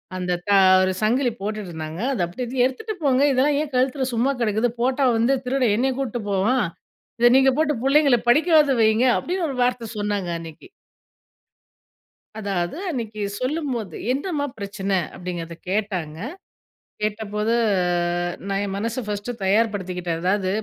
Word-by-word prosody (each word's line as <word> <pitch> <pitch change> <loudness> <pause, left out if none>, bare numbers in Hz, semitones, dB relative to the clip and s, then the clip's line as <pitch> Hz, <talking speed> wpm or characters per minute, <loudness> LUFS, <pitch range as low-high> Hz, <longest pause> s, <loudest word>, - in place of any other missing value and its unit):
அந்த 180 -1 -1
தா 200 - +4 0.3
ஒரு 185 0 +2
சங்கிலி 245 +3 +2
போட்டுட்டு 210 -2 -4
இருந்தாங்க. 160 +1 -6
அதை 180 -8 0 0.2
எடுத்து 245 +1 0
எடுத்துட்டு 430 - -3
போங்க 265 -1 +3
இதெல்லாம் 280 +3 +2
ஏன் 300 -2 -4
கழுத்துல 260 +1 +1
சும்மா 245 +4 +2
கடக்குது. 220 +2 +1
போட்டா 265 +2 +2
வந்து 245 +4 +3
திருட 260 +1 0
என்னய 265 +2 +1
கூட்டு 240 -3 -2
போவான். 210 +6 +2 0.5
இத 240 - +6
நீங்க 265 0 +5
போட்டு 310 -1 +2
புள்ளைங்கள 275 -2 +4
படிக்கவாது 305 +1 +5
வையுங்க 220 +3 +4
அப்டின்று 355 -1 -2
ஒரு 270 - -4
வார்த்த 245 -2 -1
சொன்னாங்க 205 -3 -2
அன்னைக்கு. 165 - -11 1.7
அதாவது 195 - -2
அன்னைக்கு 225 -8 -4 0.2
சொல்லும்போது, 255 - -3 0.2
என்னம்மா 285 +1 -1
பிரச்சனை 200 -1 -2 0.2
அப்டின்றத 170 -2 -6
கேட்டாங்க. 185 -7 -2 0.8
கேட்டபோது 210 +1 -1 0.2
அ - - +2 0.7
நான் 195 0 -1
என் 195 - -4
மனசை 230 +5 -2
ஃபர்ஸ்ட் 205 +2 -4
தயார்படுத்திக்கிட்டேன். 185 -5 0
அதாவது 185 +1 +1
225 Hz, 135 wpm, -23 LUFS, 195-265 Hz, 1.7 s, இத